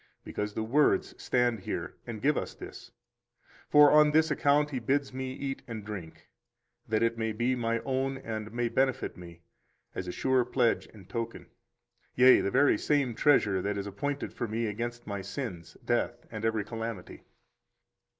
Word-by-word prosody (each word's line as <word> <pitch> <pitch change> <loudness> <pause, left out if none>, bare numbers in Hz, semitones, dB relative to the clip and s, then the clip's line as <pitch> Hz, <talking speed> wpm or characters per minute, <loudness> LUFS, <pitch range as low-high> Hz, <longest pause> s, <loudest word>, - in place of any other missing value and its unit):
Because 105 0 -4
the 110 - -1
words 140 +7 +2
stand 120 -3 +1
here - - -4
and 110 -3 -6
give 150 +1 +3
us - - -3
this; - - -10 0.8
for 150 0 +7
on 150 0 +7
this 155 +1 +3
account 145 0 +2
He 130 - -2
bids 135 +3 0
me 130 0 -4
eat 135 0 -4
and 110 -3 -6
drink, 95 -6 -8 0.6
that 110 0 +1
it 115 0 0
may 110 0 0
be 120 +4 +1
my 115 -1 -1
own 135 0 -1
and 110 -4 -5
may 120 +1 -1
benefit 130 +2 0
me, 85 -1 -12 0.5
as 90 - -5
a - - -2
sure 130 +5 +2
pledge 120 -1 +1
and 100 -4 -16
token, 115 +3 -5 0.6
yea, 130 +1 +7
the - - 0
very 135 +6 +3
same 140 -5 +1
treasure 105 -8 +3
that 100 +2 -2
is 100 - -3
appointed 140 +9 -4
for 120 - -3
me 115 +2 -2
against 120 +3 -4
my 100 -2 -4
sins, 95 - -6
death, 120 0 -1
and 110 0 -4
every 110 -2 +1
calamity. 115 -3 -6
115 Hz, 170 wpm, -29 LUFS, 105-135 Hz, 0.8 s, for